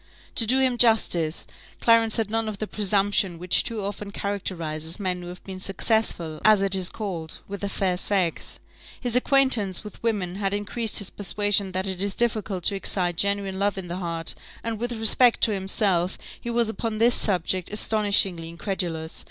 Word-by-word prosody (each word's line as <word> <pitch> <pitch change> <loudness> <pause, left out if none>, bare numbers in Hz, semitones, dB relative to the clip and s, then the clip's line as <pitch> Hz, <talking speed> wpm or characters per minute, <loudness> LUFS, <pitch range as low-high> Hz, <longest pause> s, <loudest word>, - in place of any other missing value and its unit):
To 225 - +3
do 255 +4 +4
him 260 -2 +1
justice, 175 -9 +3 0.3
Clarence 230 -1 +4
had 220 -2 -1
none 225 -1 0
of 210 - -6
the 215 - -3
presumption 200 -3 +1
which 180 +1 +2
too 220 -3 -4
often 205 0 -5
characterizes 170 -5 -4
men 185 -2 -2
who 175 - -8
have 180 +1 -10
been 190 -1 -7
successful, 190 -5 -1
as 215 -2 +5
it 195 -1 +2
is 185 -2 +4
called, 175 -7 -5
with 200 0 -7
the 200 - -2
fair 185 -2 0
sex. 185 -3 -1 0.4
His 245 -2 +1
acquaintance 250 -8 +2
with 210 - -11
women 195 -6 -1
had 200 0 -1
increased 215 +2 -2
his 205 - -2
persuasion 205 0 +1
that 185 +1 -1
it 190 -1 -3
is 200 -1 -1
difficult 215 -6 -1
to 200 - +3
excite 180 -2 -1
genuine 200 +1 0
love 200 0 +1
in 180 -2 -6
the 175 - -3
heart; 165 -3 -3 0.3
and 225 -2 -3
with 240 +1 -3
respect 230 +2 +5
to 220 - +4
himself, 190 -2 0 0.2
he 235 - -5
was 235 -1 +1
upon 220 0 -3
this 235 +2 +5
subject 185 -2 +1
astonishingly 200 -5 +1
incredulous. 170 -2 -4
200 Hz, 180 wpm, -25 LUFS, 180-220 Hz, 0.4 s, as